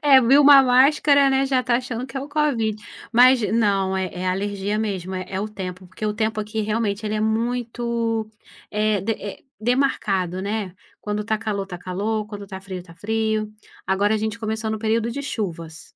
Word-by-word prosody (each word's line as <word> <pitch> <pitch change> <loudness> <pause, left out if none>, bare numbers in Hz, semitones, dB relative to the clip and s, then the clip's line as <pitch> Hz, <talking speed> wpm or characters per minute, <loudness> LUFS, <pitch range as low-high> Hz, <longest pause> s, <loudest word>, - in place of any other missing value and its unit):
é 260 - +8
viu 270 +5 +6
uma 280 -1 +9
máscara, 275 +2 +5
né, 270 0 +2
já 265 -1 +2
tá 240 0 +2
achando 250 -1 -4
que 270 - -6
é - - -1
o 280 - -6
COVID. 275 -8 +1 0.4
Mas, 250 +1 +6
não 195 -4 +2
é 190 -1 -1
é 185 +1 -3
alergia 200 +2 -1
mesmo. 190 -4 -3
É 185 - -4
é 190 - -3
o 210 - -2
tempo. 185 -2 -7
Porque 200 +4 -6
o 210 - 0
tempo 220 0 -1
aqui 215 +1 -3
realmente 215 0 -1
ele 215 0 -1
é 215 - -1
muito, 230 0 -1 0.4
eh 210 -1 +1
de 225 +2 0
é 205 -1 -8 0.2
demarcado, 210 -7 0
né. 200 -2 -3 0.3
Quando 210 0 -3
tá 220 0 0
calor 210 -3 -3
tá 180 - -7
calor, 205 +4 -2
quando 205 -1 -8
tá 190 -1 -7
frio 190 -2 -7
tá 165 - -15
frio. 220 +1 -1 0.3
Agora 200 +3 +2
a - - +1
gente 220 +1 -3
começou 220 0 -3
no 220 - -3
período 225 +1 0
de 280 +4 -4
chuvas. 170 - -5
215 Hz, 200 wpm, -22 LUFS, 195-235 Hz, 0.4 s, uma